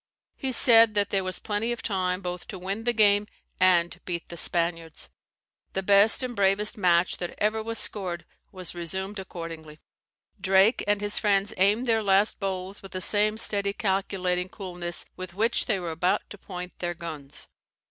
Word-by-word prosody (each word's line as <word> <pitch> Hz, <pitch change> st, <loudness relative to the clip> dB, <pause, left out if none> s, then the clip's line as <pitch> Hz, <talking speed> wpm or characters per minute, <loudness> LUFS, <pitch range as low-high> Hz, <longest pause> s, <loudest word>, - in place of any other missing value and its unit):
He 265 Hz, -2 st, -3 dB
said 230 Hz, -3 st, +5 dB
that 205 Hz, -1 st, +1 dB
there 195 Hz, -1 st, +1 dB
was 185 Hz, -1 st, -2 dB
plenty 215 Hz, +2 st, -2 dB
of 240 Hz, -, -4 dB
time 185 Hz, -2 st, -1 dB
both 180 Hz, -1 st, -6 dB
to 195 Hz, -, -7 dB
win 195 Hz, +5 st, -5 dB
the 240 Hz, -, +3 dB
game 210 Hz, -2 st, +3 dB, 0.3 s
and 175 Hz, -2 st, +3 dB
beat 170 Hz, -2 st, -5 dB
the 170 Hz, -, -7 dB
Spaniards. 165 Hz, -1 st, -2 dB, 0.6 s
The 190 Hz, -, -2 dB
best 200 Hz, +5 st, +5 dB
and 250 Hz, -1 st, -4 dB
bravest 200 Hz, +1 st, +2 dB
match 180 Hz, -3 st, +2 dB
that 175 Hz, -, -5 dB
ever 215 Hz, +1 st, 0 dB
was 225 Hz, +1 st, -3 dB
scored 180 Hz, -6 st, 0 dB, 0.3 s
was 185 Hz, -3 st, -3 dB
resumed 190 Hz, +4 st, -3 dB
accordingly. 165 Hz, -4 st, -8 dB, 0.6 s
Drake 195 Hz, +4 st, +4 dB
and 205 Hz, 0 st, +1 dB
his 205 Hz, 0 st, +1 dB
friends 200 Hz, 0 st, +1 dB
aimed 205 Hz, +6 st, +2 dB
their 225 Hz, -2 st, +2 dB
last 200 Hz, +1 st, +2 dB
bowls 190 Hz, -1 st, -4 dB
with 195 Hz, -, -12 dB
the 185 Hz, -, -3 dB
same 210 Hz, +3 st, +3 dB
steady 200 Hz, -2 st, +3 dB
calculating 190 Hz, -2 st, -1 dB
coolness 180 Hz, -4 st, -5 dB
with 185 Hz, -1 st, -8 dB
which 225 Hz, +4 st, +1 dB
they 215 Hz, -4 st, +1 dB
were 175 Hz, -2 st, -4 dB
about 170 Hz, +3 st, 0 dB
to 210 Hz, -, -8 dB
point 180 Hz, -2 st, -8 dB
their 175 Hz, -1 st, -3 dB
guns. 155 Hz, -4 st, -8 dB
190 Hz, 175 wpm, -26 LUFS, 180-210 Hz, 0.6 s, said